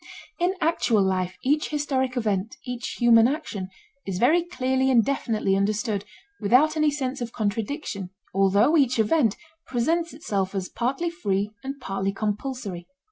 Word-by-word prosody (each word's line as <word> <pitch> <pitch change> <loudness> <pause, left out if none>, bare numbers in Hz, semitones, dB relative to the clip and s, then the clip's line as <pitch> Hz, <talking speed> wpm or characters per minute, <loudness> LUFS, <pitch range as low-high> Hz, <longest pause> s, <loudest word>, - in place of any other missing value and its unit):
In 360 +2 +1
actual 235 -10 +2
life 185 -1 -1
each 295 +4 +1
historic 270 -4 -1
event, 210 -3 -1
each 245 -1 -4
human 235 -1 +6
action, 250 - -4 0.4
is 190 -2 -2
very 310 - +4
clearly 265 -6 0
and 235 -4 +5
definitely 225 -7 0
understood 205 +1 0 0.3
without 255 +10 +4
any 305 -1 +3
sense 275 -2 -3
of 235 -1 -4
contradiction, 210 - -3 0.2
although 200 - +4
each 265 -5 +3
event 225 0 +2 0.3
presents 325 +7 0
itself 200 - -2
as 190 -1 -2
partly 270 +8 -1
free 205 - -1
and 275 +1 -5
partly 195 -4 -2
compulsory. 210 -3 -4
240 Hz, 140 wpm, -25 LUFS, 200-280 Hz, 0.4 s, human